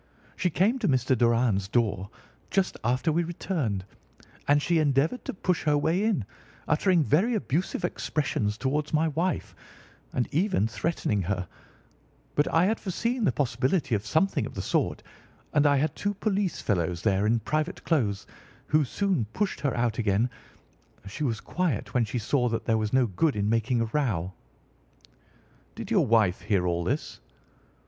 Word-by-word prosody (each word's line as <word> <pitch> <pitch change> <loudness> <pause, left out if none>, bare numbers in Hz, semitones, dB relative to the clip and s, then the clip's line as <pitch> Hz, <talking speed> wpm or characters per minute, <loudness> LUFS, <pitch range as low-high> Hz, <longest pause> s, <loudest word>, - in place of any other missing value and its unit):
She 180 - 0
came 200 - +2
to 215 - 0
Mr. 130 -2 +2
Doran's 115 -4 +2
door 105 -3 0 0.4
just 195 -1 +1
after 125 +7 +1
we 170 +3 +1
returned, 155 - -2 0.6
and 145 0 +5
she 165 +2 +1
endeavoured 150 - +1
to - - -3
push 180 -2 0
her 150 -1 +3
way 165 +7 +1
in, 210 - +1 0.4
uttering 175 0 +3
very 190 - +2
abusive 180 -1 -1
expressions 115 -11 -1
towards 145 +4 -1
my 160 +1 +2
wife, 170 +5 -2 0.6
and 125 - -1
even 160 - +2
threatening 115 -5 -1
her, 90 -1 -2 0.9
but 145 - +1
I 165 +2 +4
had 220 +3 +1
foreseen 230 +5 -1
the - - +3
possibility 130 +4 0
of 105 -2 +1
something 160 - +1
of - - -11
the - - -3
sort, - - 0 0.5
and 150 -1 +4
I 145 -1 +4
had 145 +1 0
two 205 0 -2
police 200 -3 -1
fellows 90 -4 -1
there 100 -1 +2
in 115 +2 +3
private 155 - -2
clothes, 110 - 0 0.4
who 155 0 +3
soon 180 - 0
pushed 205 -2 -1
her 140 -4 -1
out 120 -2 0
again. 110 +3 +1 0.7
She 100 +10 -5
was 115 -6 0
quiet 175 - -2
when 125 -2 +2
she 110 +4 -4
saw 125 +2 +1
that 115 - -3
there 110 -1 +2
was 110 -1 -1
no 130 -1 +4
good 135 - 0
in 100 0 0
making 115 +1 +1
a - - +1
row." 110 - -1 1.4
"Did - - -7
your - - +3
wife 110 -5 +3
hear 100 -4 +1
all 85 -1 0
this?" - - -3
135 Hz, 165 wpm, -27 LUFS, 110-170 Hz, 1.4 s, and